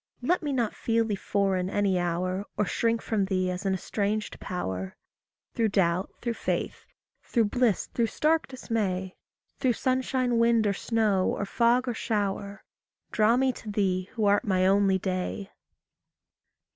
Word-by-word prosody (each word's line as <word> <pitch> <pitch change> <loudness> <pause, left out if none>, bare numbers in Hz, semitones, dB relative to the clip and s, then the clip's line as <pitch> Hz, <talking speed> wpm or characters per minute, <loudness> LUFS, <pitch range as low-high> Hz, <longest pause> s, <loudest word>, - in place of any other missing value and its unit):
Let 355 +8 +2
me 295 -3 -2
not 240 -5 0
feel 230 0 +1
thee 215 - -2
foreign 195 -2 0
any 195 -2 +1
hour, 185 +3 -1
Or 210 - +2
shrink 230 +4 0
from 210 -3 0
thee 185 -1 0
as 180 +2 -3
an 190 - +2
estranged 210 +3 -2
power. 95 - -4 0.6
Through 225 - +2
doubt, 185 -2 +1
through 235 -1 0
faith, - - -3 0.3
through 235 - +1
bliss, 240 -4 +1
through 235 -1 -1
stark 310 +8 +1
dismay, 200 -8 -2 0.4
Through 255 -3 +2
sunshine, 255 -1 0
wind, 230 -1 +4
or 205 - +2
snow, 210 -2 +1
or 200 - -2
fog, 240 +4 +2
or 245 - 0
shower, 200 -2 -2 0.5
Draw 220 +2 +3
me 260 0 +2
to 220 - -9
thee 190 -2 0
who 220 -4 0
art 205 0 +4
my 185 -3 +2
only 195 0 +4
day. 190 +1 -3
205 Hz, 155 wpm, -27 LUFS, 190-230 Hz, 0.6 s, wind